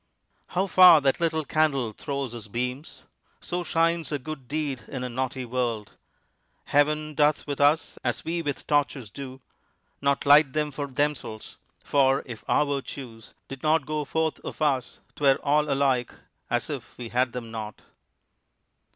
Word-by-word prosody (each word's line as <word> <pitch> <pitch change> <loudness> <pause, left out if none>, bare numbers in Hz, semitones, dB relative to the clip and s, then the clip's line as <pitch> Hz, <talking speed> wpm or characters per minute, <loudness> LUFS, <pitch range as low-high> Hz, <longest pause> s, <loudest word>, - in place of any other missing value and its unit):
How 185 +2 0
far 180 -4 +8
that 135 +2 +2
little 160 -2 0
candle 140 -7 +1
throws 140 0 -4
his 115 -3 -8
beams! 125 +7 -4 0.4
So 175 0 -3
shines 165 -2 +1
a 145 - 0
good 140 -1 -8
deed 145 -4 -2
in 125 -2 -5
a 125 - -3
naughty 130 +1 -3
world. 120 -4 -2 0.7
Heaven 150 +1 +1
doth 150 0 +2
with 145 -1 -3
us 145 +3 +2
as - - -2
we 170 +1 -1
with 145 -4 -4
torches 135 -6 0
do; 135 +1 -8 0.6
Not 140 0 +1
light 145 -1 +6
them 150 -1 0
for 145 0 -4
themselves; 135 -5 -3 0.3
for 135 -1 +3
if 120 -4 -9
our 150 - +4
virtues 135 -5 -6
Did 135 -1 -8
not 155 -1 +2
go 155 0 -2
forth 160 +2 -1
of - - -8
us, 135 -5 0
'twere 135 -2 +4
all 150 +1 +2
alike 135 -3 +1 0.4
As - - -1
if - - -7
we 120 -2 -6
had 125 +1 +1
them 120 -2 -6
not. 110 -2 -7
140 Hz, 160 wpm, -26 LUFS, 125-150 Hz, 0.7 s, far